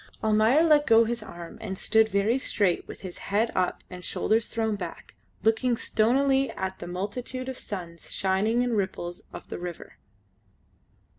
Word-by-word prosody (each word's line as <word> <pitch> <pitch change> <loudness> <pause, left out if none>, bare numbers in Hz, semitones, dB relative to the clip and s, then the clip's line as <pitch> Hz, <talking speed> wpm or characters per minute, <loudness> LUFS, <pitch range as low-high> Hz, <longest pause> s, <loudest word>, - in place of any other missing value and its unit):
Almayer 220 +7 +4
let 300 -3 +5
go 225 0 +7
his 235 0 -2
arm 170 -5 -9
and 190 -4 -4
stood 220 +2 +3
very 210 +5 +2
straight 200 -8 0
with - - -9
his 185 -2 -8
head 215 +4 +2
up 185 -1 0
and 180 -1 -9
shoulders 220 +5 +1
thrown 220 -2 -1
back, 200 - -7 0.3
looking 230 +2 +2
stonily 270 +6 +2
at 190 0 -4
the 175 - -7
multitude 220 +8 -4
of 260 - -4
suns 175 -7 -7
shining 205 +5 +1
in 245 -1 0
ripples 185 -3 -2
of - - -9
the - - -5
river. 175 -1 -7
215 Hz, 160 wpm, -27 LUFS, 190-240 Hz, 0.3 s, go